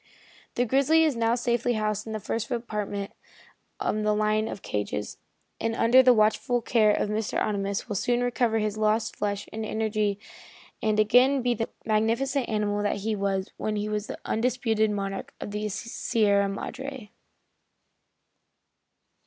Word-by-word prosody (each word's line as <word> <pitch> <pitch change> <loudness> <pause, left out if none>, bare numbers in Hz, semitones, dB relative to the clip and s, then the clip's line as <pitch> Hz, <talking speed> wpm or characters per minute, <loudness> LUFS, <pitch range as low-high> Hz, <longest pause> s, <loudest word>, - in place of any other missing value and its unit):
The 245 - +2
grizzly 275 +6 +4
is 305 -5 +2
now 230 0 +2
safely 240 0 0
housed 215 -1 -1
in - - -5
the 215 - -3
first 225 +4 -3
apartment 210 -5 -3 0.7
of - - 0
the 210 0 +2
line 215 +1 +1
of 200 - -7
cages, 105 0 -3 0.4
and 225 0 -1
under 235 +3 +6
the 255 -1 +6
watchful 235 +2 +2
care 225 -2 +3
of 210 - 0
Mr. 210 0 -1
Ohnimus 200 -1 -1
will 210 - -3
soon 240 +5 +1
recover 240 -2 +1
his 215 -1 -1
lost 215 +1 +1
flesh 205 -1 -2
and 220 0 -4
energy 215 -2 -1 0.6
and 215 -1 +1
again 250 +5 +4
be 245 0 +2
the 225 0 -3 0.2
magnificent 230 +5 +1
animal 210 -1 0
that 205 - 0
he 220 -1 0
was 195 -1 -1
when 215 - -2
he 210 0 -2
was 210 0 -2
the - - -6
undisputed 225 -2 +1
monarch 195 -1 -4
of - - -6
the 210 +1 -2
Sierra 210 -2 +1
Madre. 260 +3 -6
215 Hz, 155 wpm, -26 LUFS, 210-240 Hz, 0.7 s, under